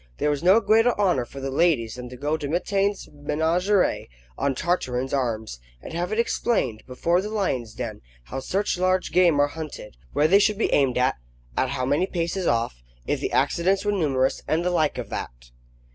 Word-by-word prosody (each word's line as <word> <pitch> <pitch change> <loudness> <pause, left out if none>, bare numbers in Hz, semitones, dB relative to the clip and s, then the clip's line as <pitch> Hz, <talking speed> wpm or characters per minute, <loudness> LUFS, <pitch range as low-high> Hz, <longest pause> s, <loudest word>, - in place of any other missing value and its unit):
There 150 - +1
was 145 - -2
no 185 +6 +6
greater 225 +2 +3
honour 180 -12 +2
for 135 - -10
the 135 0 -4
ladies 135 -7 +2
than 125 -1 -8
to 125 - -10
go 145 +4 -1
to 150 -2 -4
Mitaine's 195 +5 0
Menagerie 165 +7 +1 0.3
on 140 -1 -1
Tartarin's 130 -6 -1
arms, 110 - -2 0.2
and - - -10
have 175 +3 -2
it 215 - -1
explained 205 - 0
before 170 +8 +1
the 210 - -5
lion's 135 - -2
den 115 -4 -5 0.2
how - - -6
such 190 +6 -1
large 185 0 +1
game 175 -5 +4
are 145 0 +4
hunted, 150 - -8
where 150 - +3
they 195 +5 +6
should 210 0 +2
be 225 - 0
aimed 135 -4 +3
at, 125 +1 +2 0.4
at 130 - +1
how 130 -2 -2
many 145 +8 +1
paces 175 0 -2
off; 115 - 0 0.2
if - - -1
the - - -3
accidents 190 +4 +1
were 205 - +2
numerous, 140 -9 +1
and 165 +3 0
the 180 - +1
like 155 -4 +1
of - - -5
that. - - -7
155 Hz, 195 wpm, -24 LUFS, 130-185 Hz, 0.4 s, no